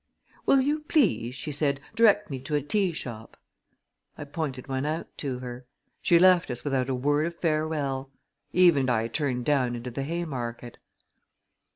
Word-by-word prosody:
"Will 275 - +6
you 295 +3 +1
please," 275 - +1
she 150 - -4
said, 140 -1 0
"direct 210 -5 +4
me 135 - -3
to 140 +4 -3
a 145 - +2
tea 190 +5 +1
shop?" 115 -8 -7 0.8
I - - -6
pointed 140 -3 -4
one 135 -1 -2
out 155 +3 -4
to 135 -4 -2
her. 125 0 -8 0.3
She 170 - +5
left 180 -2 +5
us 120 -1 -4
without 135 -2 0
a 130 - 0
word 145 +5 +1
of 170 - -6
farewell. 155 -5 -1 0.4
Eve 175 -4 +5
and 130 -1 +1
I 115 -2 +1
turned 125 -1 -2
down 130 -5 +2
into 120 +1 -6
the 135 - -4
Haymarket. 135 -7 -4
140 Hz, 170 wpm, -27 LUFS, 125-165 Hz, 0.8 s, Will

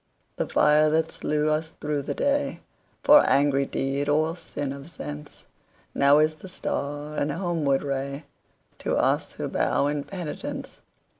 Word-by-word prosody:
The - - -2
fire 150 +1 +4
that 160 +1 +1
slew 150 0 0
us 155 +1 -1
through 150 -1 -1
the 140 - -4
dayFor 285 +1 +2
angry 140 -1 +3
deed 140 +2 -1
or 155 +3 +2
sin 145 -5 -4
of 140 +1 -9
senseNow 140 - -1
is 155 0 +1
the 190 - -11
star 145 -3 -3
and 150 - 0
homeward 160 -5 0
rayTo 140 +1 -5
us - - +1
who - - -4
bow - - +1
in 145 0 -1
penitence. 175 -2 -6
150 Hz, 135 wpm, -25 LUFS, 140-160 Hz, -, fire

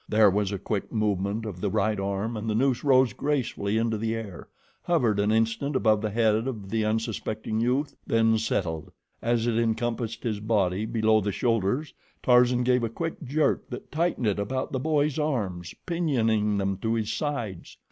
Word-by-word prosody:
There 105 -2 +5
was 100 0 0
a 100 - -2
quick 100 +1 -3
movement 105 0 -1
of 95 -5 -6
the 105 - 0
right 105 +1 0
arm 100 +4 -2
and 110 +1 -3
the 105 - 0
noose 130 +1 +1
rose 130 -5 +4
gracefully 120 -8 -1
into 115 -1 0
the 115 +1 -1
air, 105 -6 -7 0.3
hovered 120 -12 +1
an 105 +1 +2
instant 115 +6 0
above 110 -4 +3
the 110 - -1
head 110 +1 +2
of 105 -7 -5
the 110 -1 +1
unsuspecting 110 0 -2
youth, 130 +5 0
then 115 -1 +3
settled. 80 -8 -2 0.3
As 115 0 +1
it 115 -1 +1
encompassed 115 0 -1
his 110 -4 -1
body 105 -2 0
below 110 -1 +3
the 105 +1 -1
shoulders, 115 +7 0 0.3
Tarzan 125 0 +4
gave 125 0 +2
a 115 - 0
quick 165 +8 -4
jerk 145 +2 0
that - - -8
tightened 165 -5 0
it 105 -2 +1
about 130 +6 -2
the 130 - -1
boy's 150 +1 +1
arms, 100 - -2
pinioning 115 - +1
them 95 -1 -1
to 110 +3 -1
his 110 -2 -1
sides. 120 - -4
110 Hz, 180 wpm, -26 LUFS, 105-125 Hz, 0.3 s, There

